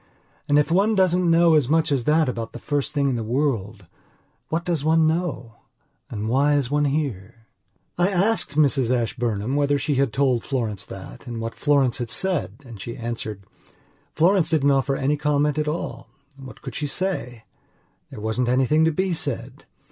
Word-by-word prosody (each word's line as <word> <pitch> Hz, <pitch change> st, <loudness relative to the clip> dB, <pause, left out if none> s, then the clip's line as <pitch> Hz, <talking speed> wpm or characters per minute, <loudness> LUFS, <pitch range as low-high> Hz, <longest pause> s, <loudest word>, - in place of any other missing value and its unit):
And, 145 Hz, -, +4 dB
if 150 Hz, +2 st, +2 dB
one 200 Hz, +5 st, +3 dB
doesn't 180 Hz, -2 st, +3 dB
know 165 Hz, 0 st, +5 dB
as 145 Hz, -5 st, +3 dB
much 160 Hz, 0 st, +2 dB
as 130 Hz, -4 st, 0 dB
that 155 Hz, +1 st, +3 dB
about 115 Hz, -2 st, -4 dB
the -, -, -6 dB
first 145 Hz, +2 st, -1 dB
thing 145 Hz, -2 st, 0 dB
in 130 Hz, -3 st, 0 dB
the 115 Hz, -, -3 dB
world, 110 Hz, -5 st, -2 dB, 0.6 s
what 165 Hz, +2 st, -2 dB
does 170 Hz, -5 st, -1 dB
one 160 Hz, +1 st, +3 dB
know 155 Hz, -9 st, -2 dB, 0.5 s
and 110 Hz, -1 st, -4 dB
why 140 Hz, +5 st, +3 dB
is 140 Hz, -3 st, 0 dB
one 145 Hz, 0 st, +2 dB
here? 120 Hz, -7 st, -3 dB, 0.5 s
I 175 Hz, +2 st, +3 dB
asked 200 Hz, -4 st, 0 dB
Mrs 140 Hz, -5 st, +3 dB
Ashburnham 120 Hz, -1 st, -1 dB
whether 145 Hz, 0 st, +2 dB
she 145 Hz, +1 st, -1 dB
had 135 Hz, -4 st, +1 dB
told 130 Hz, -3 st, +1 dB
Florence 110 Hz, -7 st, -2 dB
that 95 Hz, +7 st, -10 dB
and 120 Hz, -1 st, -5 dB
what 115 Hz, 0 st, -4 dB
Florence 140 Hz, -4 st, +1 dB
had 120 Hz, -2 st, -4 dB
said 140 Hz, -, -2 dB
and 115 Hz, -5 st, -10 dB
she 115 Hz, -, -6 dB
answered:"Florence 120 Hz, -, -3 dB
didn't 145 Hz, -3 st, +3 dB
offer 135 Hz, 0 st, +1 dB
any 140 Hz, +2 st, 0 dB
comment 150 Hz, 0 st, +1 dB
at 150 Hz, -, -1 dB
all. 155 Hz, +3 st, -4 dB, 0.3 s
What 135 Hz, -2 st, -12 dB
could 130 Hz, -, -6 dB
she 150 Hz, -, -2 dB
say? 140 Hz, -, -3 dB, 0.7 s
There -, -, -9 dB
wasn't 110 Hz, +3 st, -1 dB
anything 135 Hz, +5 st, +3 dB
to 160 Hz, -, +3 dB
be 185 Hz, +3 st, -1 dB
said. 150 Hz, -6 st, -4 dB
140 Hz, 180 wpm, -23 LUFS, 120-155 Hz, 0.7 s, know